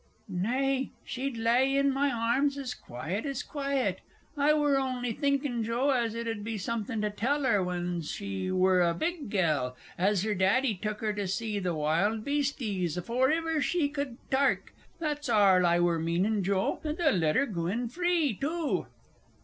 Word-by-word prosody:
Nay, 265 +3 0 0.2
she'd 260 -1 -3
lay 250 +4 +3
in 275 0 +3
my 280 +1 +2
arms 245 +5 +1
as 265 -3 -4
quiet 155 - -5
as 275 -2 -3
quiet. 275 -3 -1 0.3
I 290 +1 +3
wur 295 -2 +3
on'y 250 -3 -2
thinkin', 275 -3 0
Joe, 240 +5 +1
as 235 -4 0
it 230 0 -4
'ud 225 -2 -3
be 225 0 -3
somethin' 220 +2 -3
to 210 0 0
tell 275 +8 0
her 210 -7 +3
when 175 -1 -2
she 190 +3 -4
wur 185 0 +3
a 170 -1 +2
big 320 - -3
gell, 150 -11 0 0.2
as 195 +1 +2
her 215 -1 0
daddy 205 +6 +2
took 210 +2 -4
her 215 -1 0
to 205 -1 -3
see 210 +2 -2
th' 180 -3 -1
wild 170 +9 +1
beasties 240 - -1
afoor 240 - +1
iver 325 -1 0
she 315 -2 +1
could 280 -4 -4
tark 275 +1 +1 0.2
that's 295 -4 -3
arl 195 -5 +5
I 170 0 +3
wur 175 -1 +2
meanin', 185 +6 +1
Joe. 190 0 0
And 305 0 -3
they'll 330 -5 +3
let 160 -4 +2
'er - - +3
goo 170 -9 -3
in 235 +6 -1
free, 340 0 +1
too. 310 - -2
230 Hz, 180 wpm, -29 LUFS, 190-275 Hz, 0.3 s, arl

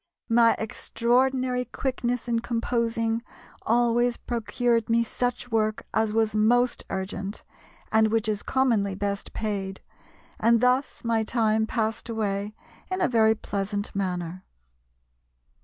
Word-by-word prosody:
My 230 0 +5
extraordinary 250 +3 +1
quickness 245 -2 -2
in 235 -1 +1
composing 230 -1 -1 0.4
always 240 +1 +2
procured 235 0 0
me 230 0 +3
such 245 +1 -3
work 215 -1 0
as 220 -1 +2
was 220 -1 +1
most 245 +3 +3
urgent, 195 +1 -4 0.5
and 220 0 +5
which 225 0 0
is 210 -1 -1
commonly 230 -7 +1
best 200 0 -3
paid; 195 -3 -3 0.6
and 230 +1 +4
thus 250 +3 +1
my 230 -1 +1
time 220 -1 +1
passed 225 -1 -2
away 210 -2 -2 0.3
in 370 0 -2
a 355 - +3
very 220 -2 +4
pleasant 205 0 -3
manner." 180 -2 -3
225 Hz, 120 wpm, -26 LUFS, 210-240 Hz, 0.6 s, My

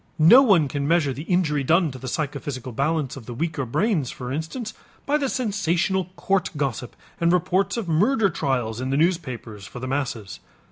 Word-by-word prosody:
No 170 +12 +8
one 195 - +4
can 140 +1 -2
measure 160 -4 +2
the 135 - -7
injury 155 -6 +1
done 165 +2 +3
to 130 - -9
the 130 - -7
psychophysical 140 -2 -4
balance 140 +2 -1
of 130 -5 -11
the 120 - -6
weaker 150 -2 -2
brains, 165 - 0
for 125 -1 -6
instance, 185 - -4 0.3
by 290 - +1
the 275 -2 0
sensational 190 -6 0
court 190 0 0
gossip 130 -4 -3 0.2
and 170 0 +3
reports 180 +4 +1
of 225 -6 -3
murder 200 - +3
trials 125 -7 -1
in 130 - -2
the 135 - +1
newspapers 130 - -1
for - - -9
the 125 - -5
masses. 125 -7 -3
155 Hz, 185 wpm, -24 LUFS, 130-185 Hz, 0.3 s, No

